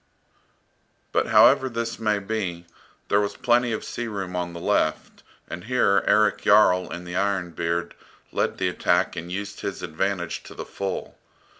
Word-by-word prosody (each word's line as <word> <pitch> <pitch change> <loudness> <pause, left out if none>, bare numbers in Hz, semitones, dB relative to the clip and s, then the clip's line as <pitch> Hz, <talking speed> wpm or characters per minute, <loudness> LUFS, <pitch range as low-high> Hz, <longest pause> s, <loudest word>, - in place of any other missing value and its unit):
But - - +1
however 130 - +6
this 115 -1 -4
may 105 -2 +1
be, 100 -4 -3 0.4
there 100 - +4
was 100 - -3
plenty 120 0 +2
of 110 - -3
sea 120 - -4
room 95 -4 -5
on 90 -1 -3
the 85 - -7
left, 80 -5 -1 0.3
and 85 +4 -7
here 115 -5 +3
Erik 105 0 +3
Jarl, 100 -3 +4
in 90 - -6
the 90 0 -6
"Iron 95 -2 0
Beard," 85 +1 -2 0.4
led - - -1
the - - 0
attack 90 0 +1
and 85 +1 -6
used 100 +2 -5
his - - -5
advantage 85 +2 -2
to - - -11
the - - -6
full. 100 -1 -5
100 Hz, 165 wpm, -24 LUFS, 90-105 Hz, 0.4 s, however